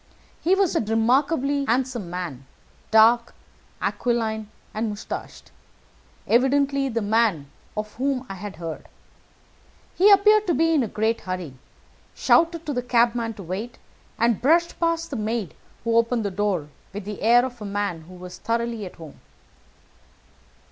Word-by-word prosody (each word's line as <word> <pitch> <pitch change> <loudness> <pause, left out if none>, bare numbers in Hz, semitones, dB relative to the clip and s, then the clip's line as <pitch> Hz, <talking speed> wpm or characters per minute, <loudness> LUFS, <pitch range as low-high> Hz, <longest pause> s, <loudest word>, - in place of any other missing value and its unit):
He 365 +4 +3
was 390 -3 +1
a - - +3
remarkably 270 +6 +1
handsome 245 -6 -1
man, 170 -7 -6 0.4
dark, 230 +2 +5 0.5
aquiline, 220 -3 -1 0.2
and 220 +1 -1
moustached 205 0 -7 0.7
evidently 275 +3 +2
the 230 -2 -2
man 205 -9 +1 0.3
of 215 0 -4
whom 265 0 -1
I - - -6
had 195 +1 -7
heard. 165 -2 -7 1.1
He 390 +4 +6
appeared 420 +1 +6
to 345 - +2
be 330 0 +3
in 305 - +3
a 235 - 0
great 220 +2 -1
hurry, 185 -6 -5 0.6
shouted 335 -1 +3
to 295 - -2
the 250 - -1
cabman 235 -2 +1
to 200 - -9
wait, 200 +8 -5 0.4
and 230 -1 +2
brushed 335 +6 +2
past 335 -1 0
the 270 - -3
maid 215 -4 -2 0.3
who 230 0 0
opened 230 -1 +2
the 200 - -1
door, 185 -6 -1 0.2
with 205 -1 -6
the 210 -1 -6
air 240 +3 +5
of 245 -3 -8
a - - -5
man 200 -4 -2
who 180 +2 -13
was 180 0 -10
thoroughly 230 -2 -2
at - - -12
home. 160 -4 -12
230 Hz, 150 wpm, -24 LUFS, 205-270 Hz, 1.1 s, He